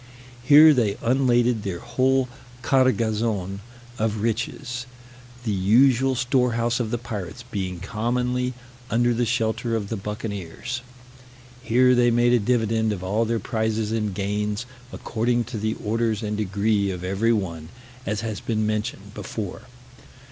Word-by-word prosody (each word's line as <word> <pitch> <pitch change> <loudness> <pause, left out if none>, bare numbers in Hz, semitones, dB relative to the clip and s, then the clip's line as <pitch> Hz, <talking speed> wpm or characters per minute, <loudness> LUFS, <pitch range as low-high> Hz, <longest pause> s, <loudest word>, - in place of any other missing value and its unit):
Here 150 +3 +8
they 110 -6 +1
unladed 120 -2 +2
their 95 -4 -3
whole 130 +3 +1 0.4
cargazon 110 -7 +1 0.4
of 110 -1 -1
riches, 120 +2 -2 0.6
the 110 - -1
usual 125 +7 +4
storehouse 120 -2 +1
of 115 -3 -1
the 120 - -1
pirates 110 -2 -6
being 95 -6 -4
commonly 125 +5 -1 0.3
under 120 +1 +2
the 120 0 0
shelter 115 0 0
of 105 -3 -3
the 115 - -2
buccaneers. 105 +3 -5 0.8
Here 125 +1 +4
they 120 -1 +4
made 120 +1 +3
a 120 - +5
dividend 110 -1 +1
of 95 -3 -4
all 105 +5 +1
their 115 +1 0
prizes 110 0 -1
and 110 -2 -1
gains, 105 +3 -2 0.3
according 120 0 -1
to 115 -1 -6
the 110 +1 -1
orders 110 0 0
and 105 0 -2
degree 100 0 +1
of 90 -2 -5
every 100 +5 +1
one, 85 -7 -2 0.3
as 105 -3 -2
has 110 -2 -4
been 110 -2 -1
mentioned 105 -1 -3
before. 110 +3 -6
115 Hz, 140 wpm, -24 LUFS, 105-120 Hz, 0.8 s, Here